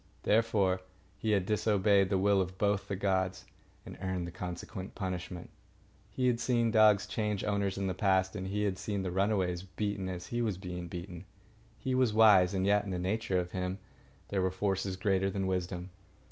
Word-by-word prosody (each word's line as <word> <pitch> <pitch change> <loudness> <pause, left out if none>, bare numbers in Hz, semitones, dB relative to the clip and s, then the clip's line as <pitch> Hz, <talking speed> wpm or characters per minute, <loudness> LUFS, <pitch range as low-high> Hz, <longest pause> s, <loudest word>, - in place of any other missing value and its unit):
Therefore, 105 -4 +2 0.3
he 110 - -3
had 100 -3 +2
disobeyed 100 -2 +3
the 100 - +2
will 100 +1 +3
of 95 0 -4
both 100 0 +1
the 100 - -2
gods, 95 -1 -1 0.4
and - - -10
earned 95 -2 -2
the 85 - -6
consequent 90 +2 -6
punishment. 90 -2 -5 0.6
He 130 - -2
had 120 -2 +2
seen 120 -2 +1
dogs 110 -2 +5
change 105 -2 -2
owners 100 -2 0
in 100 - -2
the 95 - 0
past, 95 +1 +1
and 95 -2 -4
he 105 +2 -1
had 95 -2 -1
seen 100 -2 -2
the 90 - -2
runaways 95 -2 +1
beaten 95 0 -3
as 90 -1 -5
he 120 - 0
was 105 -6 -1
being 90 -2 -6
beaten. 90 +1 -7 0.5
He 130 - -2
was 130 -4 +2
wise, 100 -4 +6
and 95 0 +1
yet 105 +1 +3
in 100 - -6
the 90 - -2
nature 95 +1 -1
of 90 0 -4
him 90 0 -3 0.5
there 100 -2 0
were 95 - +2
forces 95 0 -1
greater 95 0 +1
than 95 0 -2
wisdom. 90 0 -3
95 Hz, 190 wpm, -31 LUFS, 95-105 Hz, 0.6 s, wise